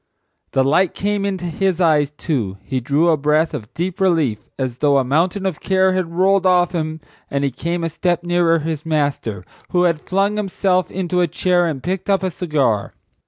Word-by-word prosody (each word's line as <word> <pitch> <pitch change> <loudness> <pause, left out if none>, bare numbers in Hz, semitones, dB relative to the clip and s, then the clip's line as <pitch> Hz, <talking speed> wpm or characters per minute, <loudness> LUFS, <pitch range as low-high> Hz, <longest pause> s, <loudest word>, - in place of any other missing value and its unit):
The 135 - +3
light 155 +6 +2
came 205 0 -1
into 190 -3 -3
his 185 +1 -1
eyes 155 -5 +3
too. 135 - -3
He 130 -2 -2
drew 145 +7 +2
a 160 - +3
breath 150 +3 +1
of 110 +2 -6
deep 175 +1 -3
relief 160 - +1
as 130 -3 -3
though 145 -2 +3
a 135 - +3
mountain 170 +9 0
of 185 -5 -2
care 190 0 +2
had 180 -3 -2
rolled 190 +1 +3
off 180 -1 +3
him, 155 -2 -3 0.3
and 140 0 -1
he 140 - 0
came 170 +6 -3
a 165 - 0
step 175 +2 -1
nearer 175 -1 +2
his 155 -1 -3
master, 145 - -1 0.3
who 180 0 +2
had 170 -3 +1
flung 200 +2 0
himself 190 -2 0
into 180 -1 -1
a 175 - +3
chair 175 +2 +1
and 145 -5 -4
picked 185 +2 -3
up 195 -1 +2
a 185 - -1
cigar. 140 - -1
170 Hz, 200 wpm, -19 LUFS, 145-185 Hz, 0.3 s, The